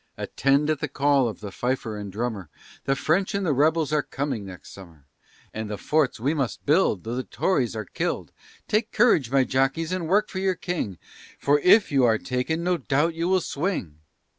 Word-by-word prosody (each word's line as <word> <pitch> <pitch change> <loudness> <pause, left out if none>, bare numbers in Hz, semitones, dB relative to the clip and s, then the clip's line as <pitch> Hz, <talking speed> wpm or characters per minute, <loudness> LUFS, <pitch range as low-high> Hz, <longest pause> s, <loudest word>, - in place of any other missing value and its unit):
Attend 140 +3 +1
at 155 - -1
the - - -2
call 140 -2 +2
of 110 - -9
the 100 -2 -6
fifer 120 0 -2
and 100 -1 -6
drummer, 105 -5 -4 0.4
The 135 - +2
French 190 +9 0
and 200 -1 -1
the 155 - +2
rebels 155 +2 +2
are 150 - +3
coming 135 -6 -4
next 90 -1 -11
summer, 85 -7 -14 0.5
And 110 -1 -5
the 105 - -4
forts 145 - 0
we 135 +7 0
must 135 -6 -3
build 150 - +2
Though 115 - -4
the 130 - -2
Tories 130 - 0
are 110 -1 -4
killed. - - -3 0.4
Take 215 +1 0
courage, 210 - +3
my 135 0 +3
jockies, 135 +6 0
and 185 -3 -2
work 205 +5 +2
for 190 - -4
your 190 -1 +1
King, 165 - -4 0.4
For 145 +1 +2
if 195 +4 +5
you 135 -2 +3
are 115 -2 +4
taken, 130 +9 -2
no 180 0 +1
doubt 145 +3 0
you 165 +1 -2
will 185 0 +3
swing. 140 - -3
140 Hz, 200 wpm, -25 LUFS, 115-165 Hz, 0.5 s, if